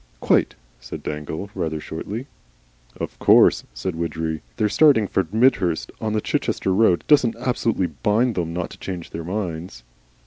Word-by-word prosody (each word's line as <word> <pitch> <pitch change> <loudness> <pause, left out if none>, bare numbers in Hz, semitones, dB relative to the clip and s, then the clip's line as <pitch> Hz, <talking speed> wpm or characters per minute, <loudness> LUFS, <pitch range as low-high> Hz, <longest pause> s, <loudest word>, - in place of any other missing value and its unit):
"Quite," - - +2 0.2
said - - -8
Dangle, 75 +6 -5
rather 80 -5 -2
shortly. 105 - -6 0.7
"Of - - -5
course," - - +5
said 75 +9 -3
Widgery, 80 -1 -3 0.2
"their 105 - +2
starting 135 -2 +4
from 95 - 0
Midhurst 110 -8 +2
on 110 -1 -1
the 110 - 0
Chichester 95 - -1
road 95 -3 +3
doesn't 125 -6 +4
absolutely 120 -5 0 0.2
bind 115 - +2
them 85 -4 -2
not 85 +1 -4
to - - -12
change 90 -3 -6
their 85 - -5
minds." 85 - -5
95 Hz, 150 wpm, -22 LUFS, 80-110 Hz, 0.7 s, course